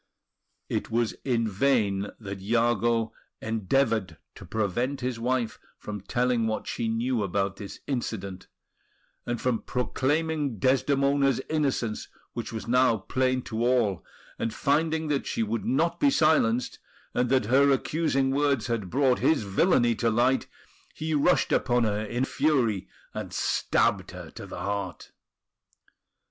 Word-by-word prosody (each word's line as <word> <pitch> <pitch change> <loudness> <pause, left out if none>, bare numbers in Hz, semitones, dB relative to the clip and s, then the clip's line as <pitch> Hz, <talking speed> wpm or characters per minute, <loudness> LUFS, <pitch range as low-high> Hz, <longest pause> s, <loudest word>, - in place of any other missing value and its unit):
It - - -2
was 115 0 0
in 115 -4 +1
vain 105 -3 +1
that 100 -3 -7
Iago 115 +1 +1 0.3
endeavoured 110 - 0 0.2
to - - -12
prevent 120 +6 -1
his 125 -2 -2
wife 120 -1 -1 0.2
from 105 -2 -6
telling 120 +2 +1
what 110 - -2
she 115 - -2
knew 115 +1 0
about 100 0 -1
this 100 -1 -8
incident, 100 -8 -4 0.8
and 120 -1 -1
from 125 -3 0
proclaiming 145 +1 -1
Desdemona's 135 +3 +2
innocence, 135 -8 -1 0.3
which 120 - -5
was 110 0 -6
now 125 -1 +4
plain 130 +5 0
to 115 0 -3
all; 120 -7 +2 0.4
and 115 - -1
finding 160 +2 +1
that 140 -2 0
she 115 - 0
would 110 +1 -2
not 160 +6 +1
be 290 - +5
silenced, 155 - +2 0.3
and 125 0 +1
that 130 -4 +3
her 135 +5 +4
accusing 135 -1 +1
words 140 -4 +1
had 115 -6 -2
brought 130 +1 +2
his 160 -8 +2
villainy 120 - +3
to 115 +1 0
light, 120 +4 +2 0.5
he 155 0 -3
rushed 150 +4 +3
upon 120 -2 +2
her 105 -1 0
in 120 +4 -1
fury, 130 -10 +1 0.3
and - - -6
stabbed - - +1
her - - -9
to - - -9
the - - -7
heart. 100 0 -4
120 Hz, 140 wpm, -27 LUFS, 110-135 Hz, 0.8 s, be